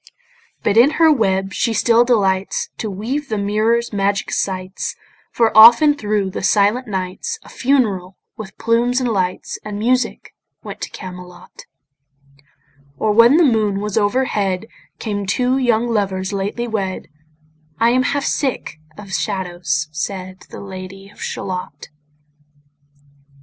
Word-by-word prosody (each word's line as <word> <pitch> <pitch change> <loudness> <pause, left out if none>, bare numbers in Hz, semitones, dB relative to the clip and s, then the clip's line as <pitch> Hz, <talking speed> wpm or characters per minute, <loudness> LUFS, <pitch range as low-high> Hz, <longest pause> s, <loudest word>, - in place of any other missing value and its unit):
But 210 - +1
in 245 +5 +7
her 325 -1 +6
web 195 -7 0
she 230 +3 0
still 235 +1 +4
delights 195 -6 0
To 220 - -3
weave 245 +9 -4
the 215 - -1
mirror's 215 +3 0
magic 200 0 -1
sights, 185 0 -3 0.4
For 225 -2 +1
often 235 +7 +8
thro' 210 -7 -2
the - - -5
silent 210 +6 +2
nights 190 - -4
A - - -15
funeral, 205 -9 0 0.2
with 210 -3 -10
plumes 235 +2 +1
and 255 - -1
lights 185 -4 -2
And 210 -1 -6
music, 250 +4 -1 0.3
went - - -9
to - - -4
Camelot: 180 -1 -11 1.3
Or 215 - +1
when 230 +7 +6
the 345 - +5
moon 215 -6 +1
was 210 -1 -4
overhead, 205 -3 0 0.3
Came 205 -3 -4
two 250 +6 +1
young 240 -2 +1
lovers 195 -4 -1
lately 205 +5 -3
wed: 195 -5 -3 0.7
"I 230 +1 +4
am 255 +1 +3
half 280 +2 -1
sick 260 - -2 0.2
of 195 -2 -10
shadows," 175 -6 -2
said 185 +4 -5
The - - -9
Lady 195 0 -9
of - - -17
Shalott. 180 -6 -5
210 Hz, 135 wpm, -19 LUFS, 190-235 Hz, 1.3 s, often